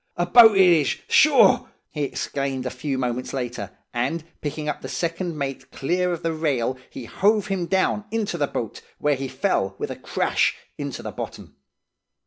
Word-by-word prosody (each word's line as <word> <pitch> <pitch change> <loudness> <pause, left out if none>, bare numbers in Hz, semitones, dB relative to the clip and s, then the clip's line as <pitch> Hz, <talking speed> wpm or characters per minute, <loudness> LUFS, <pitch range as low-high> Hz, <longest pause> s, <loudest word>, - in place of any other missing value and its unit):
'A 175 - +1
boat 225 +2 +8
it 190 -1 +7
is, 160 -6 +3
sure!' - - +5 0.2
he 150 - -4
exclaimed 135 -1 -3
a 125 - -2
few 130 +2 -3
moments 125 -1 -2
later, 120 -6 -4 0.2
and, 155 +7 -1 0.2
picking 150 +1 -4
up 150 - -3
the - - -7
second 170 -1 -2
mate 135 -2 -4
clear 180 +5 0
of 170 - -4
the 165 -1 0
rail, 135 -6 0
he 125 - -8
hove 210 - +2
him 185 -3 -1
down 195 +3 +1
into 220 -5 -2
the 145 -4 0
boat, 115 -5 -5 0.2
where 150 0 +2
he 135 0 -4
fell 130 - -1
with - - -4
a - - -4
crash - - 0 0.2
into - - -5
the - - -5
bottom. - - -8
150 Hz, 180 wpm, -23 LUFS, 130-180 Hz, 0.2 s, boat